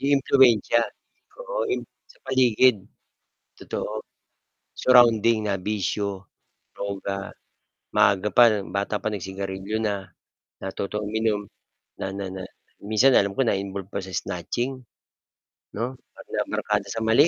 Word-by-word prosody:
Yung 140 0 +3
impluwensiya, 120 -4 +4 0.6
oo - - -2
yung - - -3 0.2
sa - - -22
paligid, 125 -5 +4 0.8
totoo, - - -4 0.8
surrounding 115 -3 +5
na 100 - +1
bisyo, 100 0 -2 0.5
droga, 100 0 -4 0.6
maaga 105 -1 +3
pa 110 -4 +5
bata 100 +3 -2
pa 110 +1 -2
nag-sigarilyo 95 +1 -4
na, 100 -3 -2 0.5
natutong 100 +2 -4
uminom, 105 -2 -1 0.5
na 95 - -4
na 100 0 -4
na 95 0 -6 0.4
minsan 115 +6 +4
alam 100 0 +3
ko 95 - -3
na-involved 100 -5 -1
pa 95 - -4
sa 95 - -9
snatching, 120 +9 -3 0.9
'no, 120 +4 -3 0.2
na - - -17 0.2
nabarkada 105 -1 -1
sa 115 -1 -3
mali, 115 +8 +5
105 Hz, 120 wpm, -25 LUFS, 100-120 Hz, 0.9 s, surrounding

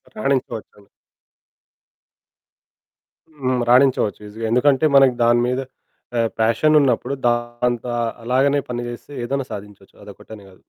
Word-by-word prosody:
రాణించవచ్చండి. 120 - -3 2.5
హ్మ్. 130 -1 0
రాణించవచ్చు 125 -5 +3
ఈజీగా. 110 +2 -7
ఎందుకంటే 135 +4 +3
మనకి 135 -3 +5
దాని 120 0 +4
మీద 125 +1 -1 0.6
ఆహ్, 115 -1 +2
పాషన్ 115 +8 +3
ఉన్నప్పుడు 135 -1 0
దాంతో 120 0 -1 0.3
అలాగానే 135 +4 +2
పని 120 0 -3
చేస్తే 120 +4 -10
ఏదైనా 135 +1 -3
సాధించవచ్చు 100 -1 -10
అదొక్కటనే 105 0 -12
కాదు. 95 - -22
120 Hz, 105 wpm, -20 LUFS, 115-130 Hz, 2.5 s, మనకి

